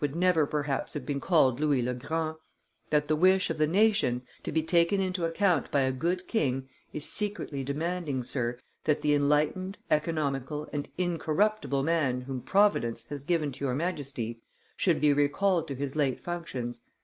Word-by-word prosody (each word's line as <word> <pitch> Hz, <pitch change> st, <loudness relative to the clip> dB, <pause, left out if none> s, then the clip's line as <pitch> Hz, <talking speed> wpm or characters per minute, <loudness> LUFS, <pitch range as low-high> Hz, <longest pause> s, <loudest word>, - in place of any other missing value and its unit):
would 145 Hz, 0 st, -1 dB
never 175 Hz, -4 st, +3 dB
perhaps 150 Hz, -1 st, -2 dB
have 145 Hz, -4 st, -4 dB
been 140 Hz, 0 st, -2 dB
called 135 Hz, -8 st, +3 dB
Louis 145 Hz, -4 st, +2 dB
le 125 Hz, +1 st, -1 dB
Grand; 160 Hz, +5 st, -2 dB, 0.5 s
that 150 Hz, -1 st, +2 dB
the 155 Hz, -, +2 dB
wish 185 Hz, +3 st, +4 dB
of -, -, -4 dB
the 155 Hz, -, +4 dB
nation, 195 Hz, -, +3 dB, 0.2 s
to -, -, -4 dB
be 160 Hz, -, +1 dB
taken 170 Hz, +4 st, +3 dB
into 185 Hz, -2 st, 0 dB
account 165 Hz, -3 st, +1 dB
by 140 Hz, -, +2 dB
a 130 Hz, 0 st, +2 dB
good 175 Hz, +7 st, -2 dB
king, 135 Hz, -, 0 dB, 0.2 s
is 150 Hz, -, -4 dB
secretly 205 Hz, -9 st, -2 dB
demanding, 150 Hz, -1 st, -2 dB
Sir, 120 Hz, -1 st, -2 dB, 0.3 s
that 150 Hz, -1 st, +1 dB
the 150 Hz, -, +3 dB
enlightened, 150 Hz, +7 st, +1 dB
economical, 150 Hz, -2 st, -1 dB
and 145 Hz, -1 st, -3 dB
incorruptible 175 Hz, -2 st, 0 dB
man 140 Hz, -6 st, +1 dB
whom 130 Hz, 0 st, -5 dB
Providence 120 Hz, -, +2 dB
has 145 Hz, -2 st, -4 dB
given 155 Hz, -2 st, 0 dB
to 135 Hz, +2 st, -9 dB
your 130 Hz, -2 st, 0 dB
Majesty, 135 Hz, -8 st, -3 dB, 0.3 s
should 175 Hz, -5 st, +2 dB
be 150 Hz, -1 st, +4 dB
recalled 160 Hz, +5 st, +2 dB
to 140 Hz, -, -4 dB
his 140 Hz, +1 st, -4 dB
late 140 Hz, -4 st, +1 dB
functions. 130 Hz, -9 st, -5 dB
150 Hz, 175 wpm, -29 LUFS, 135-175 Hz, 0.5 s, wish